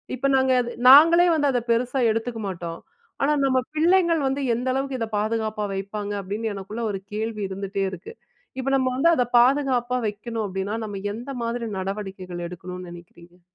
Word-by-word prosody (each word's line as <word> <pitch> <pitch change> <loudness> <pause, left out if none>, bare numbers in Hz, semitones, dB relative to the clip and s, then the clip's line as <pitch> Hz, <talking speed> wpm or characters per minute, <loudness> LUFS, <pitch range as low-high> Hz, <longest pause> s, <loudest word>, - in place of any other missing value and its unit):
இப்ப 270 +2 0
நாங்க 265 0 +3
அது 240 0 -5 0.2
நாங்களே 330 +6 +8
வந்து 290 -2 +2
அத 245 - +1
பெருசா 250 +3 +1
எடுத்துக்க 225 +1 -3
மாட்டோம். 170 -3 -5 0.4
ஆனா 300 +2 +3
நம்ம 260 -1 +3 0.2
பிள்ளைங்கள் 340 0 +3
வந்து 270 +1 -1
எந்த 245 +3 -3
அளவுக்கு 270 0 -2
இத 225 - -2
பாதுகாப்பா 215 0 -1
வைப்பாங்க. 200 +1 -4
அப்டின்னு 210 +3 -3
எனக்குள்ள 205 +4 -6
ஒரு 195 - -4
கேள்வி 215 0 -3
இருந்துகிட்டே 195 +1 -3
இருக்கு. 185 - -9 0.5
இப்ப 260 - -4
நம்ம 260 -1 +2
வந்து 275 +6 +4
அத 250 - +2
பாதுகாப்பா 250 -1 +2
வைக்கணும் 215 +2 -4
அப்டின்னா, 195 +2 -3
நம்ம 200 -2 -6
எந்த 245 +5 -7
மாதிரி 235 0 -2
நடவடிக்கைகள் 190 -3 -5
எடுக்கணும்னு 180 +1 -8
நெனைக்கிறீங்க? 175 +1 -15
225 Hz, 165 wpm, -24 LUFS, 195-260 Hz, 0.5 s, நாங்களே